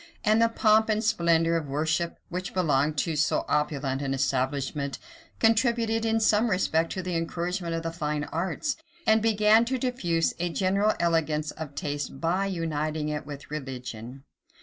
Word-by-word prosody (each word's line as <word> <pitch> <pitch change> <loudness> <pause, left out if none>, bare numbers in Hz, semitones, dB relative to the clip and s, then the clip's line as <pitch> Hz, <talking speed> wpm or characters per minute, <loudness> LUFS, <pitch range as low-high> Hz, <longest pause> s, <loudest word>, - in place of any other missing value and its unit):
And 215 +1 +4
the 230 - +4
pomp 220 -1 +3
and 215 0 +1
splendor 170 -4 +2
of 155 -3 -4
worship 160 +4 -1
which 180 +1 -5
belonged 150 -4 +1
to 160 +2 0
so 150 +1 +1
opulent 145 -2 0
an 135 -1 -1
establishment, 135 +1 -1 0.4
contributed 225 0 +2
in 225 0 +2
some 220 +1 +3
respect 165 -4 +1
to 185 - -4
the 180 -1 -3
encouragement 170 +1 -2
of 165 - -3
the 165 - -2
fine 150 -3 -2
arts, 170 - -2 0.3
and 220 0 +4
began 215 0 +4
to 260 +2 -1
diffuse 195 -11 0
a 175 +1 0
general 195 +4 +1
elegance 155 -3 +1
of 150 -3 -8
taste 145 -2 -4
by 180 +5 0
uniting 155 -4 -2
it 150 -2 -4
with 145 0 -9
religion. 130 -3 -6
165 Hz, 160 wpm, -27 LUFS, 150-210 Hz, 0.4 s, And